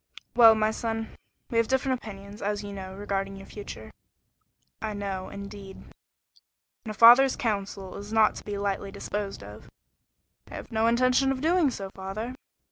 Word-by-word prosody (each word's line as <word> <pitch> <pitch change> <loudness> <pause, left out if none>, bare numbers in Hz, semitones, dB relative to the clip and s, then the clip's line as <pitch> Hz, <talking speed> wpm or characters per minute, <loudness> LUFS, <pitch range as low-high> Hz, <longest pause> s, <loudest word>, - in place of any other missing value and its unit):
"Well, 225 -2 +8
my 215 0 +2
son, 225 0 -4 0.4
we 230 - +2
have 230 - +2
different 265 -1 0
opinions, 200 0 -10
as 205 0 -2
you 200 0 -7
know, 190 -1 -7
regarding 195 -1 -3
your 195 0 -10
future." 205 -1 -9 0.9
"I 220 -1 -3
know, 195 -2 -4
indeed." 200 -1 -9
"And 225 - -18
a - - -3
father's 245 +5 +8
counsel 200 -4 -3
is 205 +1 -8
not 220 -1 +4
to - - -9
be 205 -1 -4
lightly 200 0 -2
disposed 200 - -5
of." 105 +1 -12 0.8
"I - - -9
have - - -8
no 225 0 +2
intention 255 +3 +3
of 265 - -2
doing 330 -1 +3
so, 195 -6 -6
father." 200 +6 -5
210 Hz, 165 wpm, -27 LUFS, 195-230 Hz, 0.9 s, Well